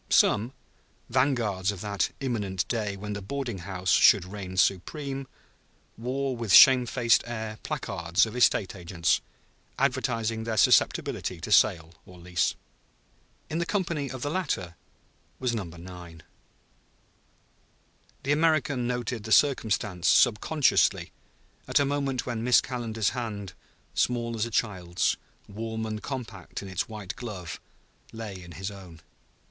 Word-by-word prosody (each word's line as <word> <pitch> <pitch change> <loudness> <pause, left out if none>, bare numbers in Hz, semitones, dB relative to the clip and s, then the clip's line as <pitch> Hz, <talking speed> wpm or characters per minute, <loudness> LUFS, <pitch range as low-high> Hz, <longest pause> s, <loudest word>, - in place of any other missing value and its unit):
Some, 115 +5 +3 0.6
vanguards 115 -8 +1
of 100 -3 -8
that 100 -3 -1
imminent 105 -8 -2
day 105 -4 -2
when 105 +1 -5
the 105 - -5
boarding 120 -1 -4
house 90 0 -3
should 100 -4 +6
reign 95 -1 -7
supreme, 135 - 0 0.7
wore 130 +3 -2
with 115 -4 -3
shamefaced 125 -1 +7
air 110 -2 -5
placards 85 +3 0
of 110 +1 -8
estate 115 -5 +3
agents, 85 -1 0 0.6
advertising 115 0 0
their 110 -1 -3
susceptibility - - +2
to - - -6
sale 80 0 +4
or 90 - -13
lease. 90 0 -1 0.9
In 160 - -3
the 170 - 0
company 170 -8 -1
of 130 -2 -6
the 145 - -2
latter 140 - -2 0.6
was 125 -2 -1
Number 90 -7 -5
9. 85 -2 -11 2.0
The 140 - 0
American 145 -5 +2
noted 120 -2 -3
the 110 - -7
circumstance 105 - +2
subconsciously, 135 +6 +3 0.6
at - - +3
a 140 - +3
moment 135 -3 -1
when 120 -2 -3
Miss 125 0 +6
Calendar's 115 -4 -2
hand, 105 -6 -5 0.4
small 120 -1 0
as 115 +1 -1
a - - -7
child's, 95 -6 0 0.3
warm 110 +2 -4
and 110 -1 -4
compact 110 -10 -6
in - - -8
its 95 +3 -2
white 105 -4 -6
glove, 95 -9 -7 0.5
lay 105 -5 -7
in 85 -1 -11
his 95 +3 -5
own. 90 -5 -12
110 Hz, 130 wpm, -27 LUFS, 95-125 Hz, 2.0 s, shamefaced